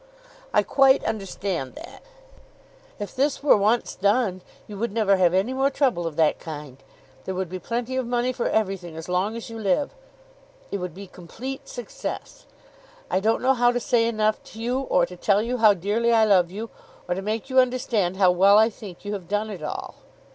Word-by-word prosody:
"I - - +3
quite 270 -1 +4
understand 195 -9 -3
that." - - -11 1.0
"If 205 - -7
this 280 +2 0
were 295 - +6
once 215 +3 +1
done 200 -1 +1 0.2
you 210 - -9
would 235 0 -1
never 205 -3 +2
have 180 -2 +4
any 200 +7 +1
more 270 +1 +2
trouble 255 - 0
of 160 - -6
that 160 -1 +2
kind. 150 -4 -8 0.5
There 190 - -3
would 185 -2 -3
be 185 +1 -5
plenty 240 +5 -3
of 255 -2 -1
money 245 +1 0
for 245 - -1
everything 190 -6 -2
as 160 - -7
long 185 +5 0
as 230 0 -7
you 225 - -7
live. 210 - 0 0.8
It - - -1
would 180 -2 -5
be 200 +1 -8
complete 225 +10 -8
success. 245 -2 -7 0.6
I 185 - +2
don't 220 +5 +1
know 265 +1 +4
how 245 -1 +3
to 245 - -1
say 230 -1 +2
enough 215 -1 0
to 220 - -12
you, 245 +3 -1
or 180 -10 +2
to 180 - -11
tell 200 +3 +2
you 245 +2 -2
how 215 -3 +6
dearly 210 +6 0
I 225 -1 +5
love 185 -5 +4
you, 215 +5 -7 0.4
or 180 - 0
to 190 - -4
make 220 +6 -3
you 260 - +5
understand 240 -7 +1
how 185 -2 +5
well 195 +3 +5
I 220 +2 +5
think 205 -3 -11
you 205 - -3
have 190 -4 -6
done 210 +1 -1
it 185 -6 -7
all." 150 - -6
210 Hz, 205 wpm, -24 LUFS, 185-240 Hz, 1.0 s, were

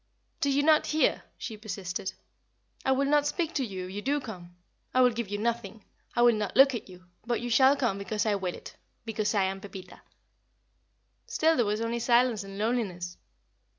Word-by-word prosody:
"Do 285 -4 +1
you 280 +1 +2
not 310 0 +4
hear?" 310 0 +2 0.2
she 220 - -6
persisted. 190 -3 -5 0.7
"I 265 - +2
will 270 +1 +2
not 295 +1 +3
speak 335 +1 -1
to 275 - 0
you 190 -6 -5
if 185 - -8
you 205 - -4
do 285 +5 0
come; 180 -9 -9 0.4
I 255 - +5
will 250 -1 +6
give 230 -3 -4
you 205 - -2
nothing; 230 -1 -3 0.3
I 240 - +4
will 240 -1 +7
not 210 0 -3
look 270 0 +7
at 225 -4 -5
you; 180 0 -14 0.2
but 240 +1 -1
you 240 0 -4
shall 265 +4 +6
come 240 -8 0
because 205 +1 -2
I 215 - +2
will 190 -3 -2
it - - -11 0.3
because 215 -1 -1
I 200 - +3
am 190 0 -2
Pepita." 195 -2 -10 1.3
Still 320 +1 +2
there 240 -6 +2
was 210 +2 -1
only 230 +1 -1
silence 235 -2 +3
and 195 0 -9
loneliness. 200 -6 -2
225 Hz, 200 wpm, -28 LUFS, 200-260 Hz, 1.3 s, will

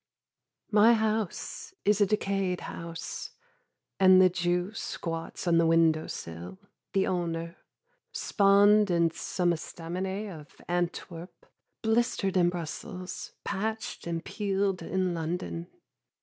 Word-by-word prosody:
My 220 +3 +6
house 220 - -2
is 210 0 +3
a 205 - +5
decayed 195 -3 0
house, 165 -1 -6 0.7
And 185 -1 +8
the 185 -1 +6
jew 175 +2 0
squats 165 -7 -5
on 170 -1 +4
the 165 - +4
window 165 -1 +3
sill, 85 - -7 0.4
the 195 -1 +3
owner, 170 -1 -2 0.5
Spawned 205 +1 +4
in 170 -2 +3
some 175 +1 0
estaminet 185 +5 -4
of 145 - -19
Antwerp, 175 0 -3 0.4
Blistered 220 -4 +1
in 175 -1 +4
Brussels, 180 +2 -6
patched 220 -1 -3
and 165 -1 -3
peeled 195 -2 -1
in 185 -1 -1
London. 170 +1 -3
180 Hz, 110 wpm, -29 LUFS, 170-200 Hz, 0.7 s, And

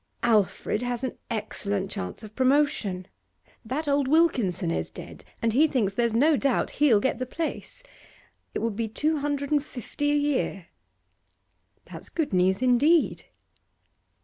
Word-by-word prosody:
'Alfred 215 -1 +1
has 245 0 -3
an 260 - -3
excellent 205 -3 -2
chance 90 - -5
of 215 0 -11
promotion. 255 -9 +1 0.6
That 275 +7 -3
old 280 -1 +2
Wilkinson 260 - +2
is 80 -1 -2
dead, - - -11 0.2
and 225 -1 +2
he 300 +6 +5
thinks 225 -9 0
there's 235 +1 0
no 295 +6 +4
doubt 275 -2 0
he'll 250 -8 +6
get 260 +5 -1
the 255 - -3
place. 330 - -5 0.7
It - - -2
would 225 -3 -1
be 230 +1 -2
two 305 +8 0
hundred 285 0 -2
and 295 -2 +2
fifty 290 +1 -4
a - - +2
year.' 285 - -1 1.2
'That's - - -11
good 320 - -2
news, 185 +5 +2
indeed. 285 +7 +3
245 Hz, 150 wpm, -26 LUFS, 210-290 Hz, 1.2 s, he'll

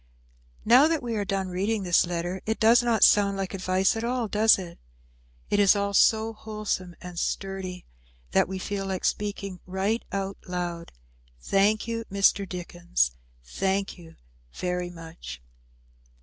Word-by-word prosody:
Now 250 +7 +7
that 320 -4 -1
we 235 -2 -3
are 205 - 0
done 190 -1 -2
reading 200 +4 -1
this 175 -1 +3
letter 175 +2 -3
it 220 - -1
does 230 +2 +6
not 235 -2 +2
sound 200 -1 +5
like 195 0 -3
advice 185 +1 +1
at 225 - -3
all, 240 -1 -1
does 215 +2 +5
it. 175 -3 -9 0.7
It 205 - +3
is 200 0 +6
all 200 0 -1
so 220 +2 +4
wholesome 210 -5 -4
and 180 -2 -7
sturdy 190 -2 -4 0.5
that - - +3
we 190 +1 -4
feel 195 +1 -4
like 190 -1 -3
speaking 200 -3 -2
right 195 +5 -1
out 195 0 -3
loud, 175 -2 -4 0.5
"Thank 200 - +2
you, 230 0 -3
Mr. 200 -1 +2
Dickens, 175 - -1 0.3
thank 195 - -2
you 165 -2 -14 0.4
very 180 0 -2
much." 165 - -10
195 Hz, 150 wpm, -26 LUFS, 180-215 Hz, 0.7 s, Now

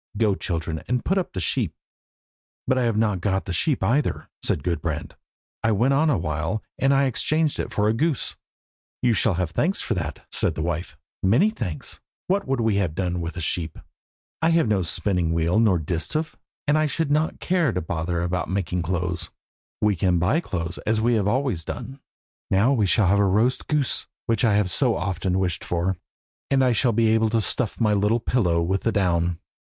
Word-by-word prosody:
Go, 105 -2 +3
children, 80 -4 -3
and 125 -1 -1
put 190 +1 +2
up 185 - -4
the 95 - -3
sheep." 85 - 0 0.9
"But 130 - +2
I 125 - +1
have 115 -2 +1
not 105 -5 +1
got 95 0 0
the 95 - -3
sheep 135 - +1
either," 140 +6 0
said - - 0
Gudbrand. 85 -3 -3 0.5
"I 110 - +3
went 125 +7 +2
on 155 +3 +3
a 135 - +2
while, 80 +5 -2 0.2
and 135 +1 +3
then 140 - +4
I - - +3
exchanged 150 +4 +1
it - - -3
for 105 0 +1
a 110 - +3
goose." 150 +3 -1 0.7
"You 120 -2 +4
shall 105 -2 +2
have 90 -2 -1
thanks 180 - 0
for 115 - -2
that," 80 - -4
said - - 0
the 80 - -2
wife, 85 0 -3 0.2
"many 125 - +4
thanks! 90 - -5 0.3
What 195 -2 0
would 135 -1 0
we 110 -3 +2
have 90 -6 0
done 90 -2 -1
with 85 +2 -5
a - - -3
sheep? 80 -1 -2 0.6
I 160 - +3
have 165 -5 +3
no 105 -3 +2
spinning 90 -1 0
wheel 85 +5 +2
nor 105 -6 +4
distaff, 90 - -3 0.3
and 150 +1 +3
I 155 - +2
should 155 0 -1
not 155 +2 +1
care 175 -6 +1
to 90 - -1
bother 85 +1 -2
about 90 +1 -2
making 90 -2 -1
clothes. 85 0 -2 0.5
We 105 -1 +3
can 90 0 +2
buy 95 - +2
clothes, 85 - -4
as 110 0 0
we 120 +2 +2
have 105 -3 +1
always 120 - 0
done. 135 - -7 0.5
Now 105 +8 +3
we 110 -7 +2
shall 105 +2 +3
have 100 +2 +3
roast 105 +6 +2
goose, 150 -4 0 0.2
which 115 -1 0
I 110 -4 +4
have 100 -3 +2
so - - +3
often 90 0 -1
wished 90 -3 -1
for, 90 +2 -1 0.5
and 135 -1 +3
I 125 - +4
shall 120 +1 +2
be 115 0 +2
able 110 0 +3
to 115 +1 +1
stuff 110 +1 0
my 110 -3 +3
little 105 +3 +2
pillow 90 -9 +1
with 95 +3 0
the 115 - +1
down. 85 -4 +1
105 Hz, 205 wpm, -24 LUFS, 90-125 Hz, 0.9 s, then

